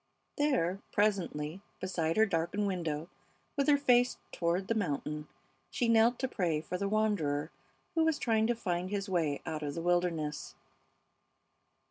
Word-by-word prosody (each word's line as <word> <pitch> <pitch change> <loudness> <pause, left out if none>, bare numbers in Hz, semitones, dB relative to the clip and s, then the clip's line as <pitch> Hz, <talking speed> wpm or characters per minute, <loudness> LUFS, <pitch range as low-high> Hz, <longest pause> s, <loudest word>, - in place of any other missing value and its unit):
There, 245 - +1
presently, 190 -5 0 0.2
beside 170 -3 -1
her 220 - +6
darkened 180 +2 0
window, 165 -5 -2 0.5
with 280 0 +1
her 290 -1 +6
face 245 -3 +3
toward 175 +2 0
the - - +2
mountain, 150 -6 -2 0.4
she 240 - 0
knelt 230 +1 +5
to 260 - -1
pray 175 -10 0
for 165 - -5
the 200 +2 -1
wanderer 175 -9 0 0.4
who 325 -2 +3
was 320 -2 +2
trying 220 -2 +2
to 240 - +1
find 180 -4 -2
his 200 0 -2
way 165 -6 0
out 155 -1 -3
of 145 -1 -3
the 165 - -3
wilderness. 170 -4 0
185 Hz, 150 wpm, -32 LUFS, 160-220 Hz, 0.5 s, her